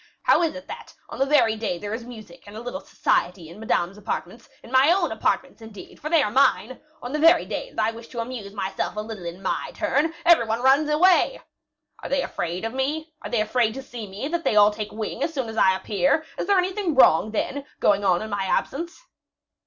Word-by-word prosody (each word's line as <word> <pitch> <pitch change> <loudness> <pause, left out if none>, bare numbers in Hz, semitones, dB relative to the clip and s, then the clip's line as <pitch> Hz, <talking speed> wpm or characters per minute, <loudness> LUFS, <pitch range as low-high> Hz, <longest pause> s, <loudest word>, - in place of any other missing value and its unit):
How - - +4
is 320 -3 0
it 275 +1 -9
that, 460 +1 -10
on - - -8
the 270 - +2
very 260 -7 +4
day 215 -5 -3
there 205 +4 -6
is 230 +1 -4
music 220 -7 -12
and 205 +1 -10
a - - -5
little 245 +4 -5
society 175 -2 -1
in 175 +5 -12
Madame's 195 -3 -1
apartments 225 +2 -5
in 230 - -13
my 265 +4 +5
own 350 -3 +1
apartments, 235 +3 -1
indeed, 220 -3 -12
for 305 - -5
they 325 -2 +4
are 210 - -2
mine 260 -1 +2 0.2
on 245 - -5
the 300 - -1
very 330 +2 +5
day - - -5
that - - -7
I 225 - 0
wish 230 +1 -11
to 235 - -7
amuse 230 -4 -5
myself 195 0 -3
a - - -3
little 215 -4 -8
in 175 +3 -7
my 190 - -2
turn, 315 +4 0
every 340 -10 +5
one 225 +2 -2
runs 275 +3 +4
away? 360 +10 +3 0.6
Are - - -6
they 275 -1 +1
afraid 175 +1 -4
to 260 -3 -2
see 235 -4 -8
me, 200 +8 -5
that 340 0 -2
they 220 - +1
all 210 0 +6
take 210 0 -6
wing 215 0 -5
as 325 - -2
soon 260 -4 -2
as 220 - -7
I 190 -3 +4
appear? 225 +11 0
Is - - -4
there 400 -1 +4
anything 370 -2 0
wrong, 215 -6 +5
then, 265 +6 -3 0.2
going 205 -1 +2
on 185 0 +2
in 220 - -7
my 200 -1 -1
absence?" 335 - -2
230 Hz, 220 wpm, -24 LUFS, 210-295 Hz, 0.6 s, all